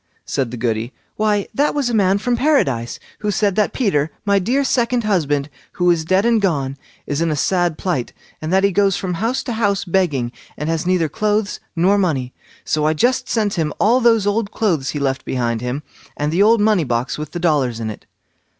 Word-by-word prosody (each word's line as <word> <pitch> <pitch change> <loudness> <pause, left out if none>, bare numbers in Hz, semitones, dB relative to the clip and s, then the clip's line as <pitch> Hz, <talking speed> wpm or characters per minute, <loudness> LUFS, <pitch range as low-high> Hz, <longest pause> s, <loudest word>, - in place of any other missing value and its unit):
said 135 -4 -1
the 120 - -6
Goody; 115 +1 -2 0.2
"why, 210 -2 +1
that 290 +2 +1
was 285 -4 0
a 240 - -1
man 195 -3 +3
from 240 +4 0
Paradise, 145 - +1 0.2
who 210 - -2
said 205 -1 +1
that 210 -2 +2
Peter, 160 - 0 0.2
my 200 -1 +3
dear 250 +9 +1
second 245 -2 +1
husband, 145 -9 0 0.3
who 180 0 +3
is 165 -2 +1
dead 190 +5 +2
and 230 -2 +3
gone, 140 -8 0 0.3
is 145 +2 -2
in 165 - +1
a 155 - 0
sad 175 +1 +1
plight, 145 -10 -2 0.3
and 155 +1 -3
that 190 +1 +3
he 200 - +4
goes 195 0 +2
from 185 -2 -3
house 225 +9 -1
to 245 - -3
house 205 -3 0
begging, 165 -10 0 0.3
and 150 +2 -3
has 165 +1 -1
neither 180 -3 +2
clothes 210 +4 -1 0.2
nor 190 +4 +3
money; 135 -9 -1 0.3
so 155 -1 0
I 155 - +1
just 245 +10 +1
sent 210 -3 0
him 155 -2 0
all 240 +5 +4
those 225 -3 +4
old 205 +1 0
clothes 165 -12 0
he 150 - -3
left 135 -2 -1
behind 120 -3 -1
him, 125 +4 -3 0.3
and 150 +1 -1
the 175 +4 +2
old 220 +1 +5
money 210 -5 +3
box 125 +1 -2
with 150 -1 -5
the 175 - -5
dollars 145 -9 +1
in 110 -1 -3
it." - - -12
180 Hz, 215 wpm, -19 LUFS, 145-210 Hz, 0.3 s, old